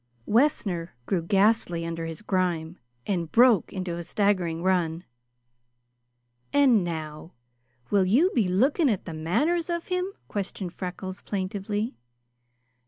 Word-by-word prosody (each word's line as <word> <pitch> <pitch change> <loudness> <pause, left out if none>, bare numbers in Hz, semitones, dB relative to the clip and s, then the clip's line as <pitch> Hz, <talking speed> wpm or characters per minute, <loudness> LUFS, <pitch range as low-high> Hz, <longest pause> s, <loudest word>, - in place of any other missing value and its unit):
Wessner 205 - +1
grew 180 +3 0
ghastly 195 -2 +2
under 165 0 -4
his 165 +4 -7
grime 175 -4 -1 0.3
and 175 -5 -2
broke 235 -4 +5
into 185 -3 -4
a - - -4
staggering 175 -3 0
run. 175 -3 +1 1.5
"And 265 -8 +5
now 160 -1 -6 0.6
will 200 -2 +4
you 275 - +4
be 220 -7 +2
looking 270 - +3
at 205 -5 -1
the 165 - -6
manners 300 - 0
of 340 +1 -3
him?" 365 +1 -1 0.2
questioned 190 -3 -4
Freckles 185 0 -6
plaintively. 205 +3 -3
190 Hz, 120 wpm, -26 LUFS, 170-225 Hz, 1.5 s, broke